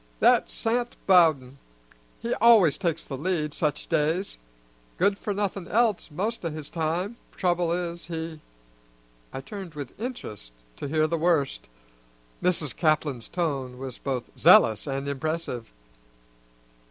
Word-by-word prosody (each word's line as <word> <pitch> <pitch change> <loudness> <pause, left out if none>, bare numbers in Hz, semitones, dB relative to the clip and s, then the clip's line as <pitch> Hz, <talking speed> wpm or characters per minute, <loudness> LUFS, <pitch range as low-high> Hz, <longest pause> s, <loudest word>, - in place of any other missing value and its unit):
"That's - - +4
Sant 240 +1 -1
Bowden; 155 -8 +4 0.6
he 235 - -2
always 220 -10 +6
takes 170 -4 -1
the 135 -2 -6
lead, 155 -3 -1
such 150 -2 -1
days. 165 +4 0 0.6
Good 200 +2 +2
for 210 - -3
nothing 200 -3 -2
else 225 -5 +1
most 205 +9 -3
o' 165 - -1
his 155 -2 -8
time; 175 +7 -2 0.2
trouble 175 -2 +1
is, 170 -1 -3
he" 160 -2 -5 0.9
I 135 - -5
turned 185 +1 -8
with 140 -4 -6
interest 105 - -6 0.2
to - - -5
hear 155 +2 +2
the 165 +1 -1
worst. 160 -4 +1 0.7
Mrs. 165 -6 +1
Caplin's 155 -6 0
tone 140 -8 -2
was 130 -1 -7
both 130 -3 -3
zealous 110 +5 +6
and 135 0 -3
impressive. 140 -4 -3
165 Hz, 130 wpm, -26 LUFS, 140-185 Hz, 0.9 s, always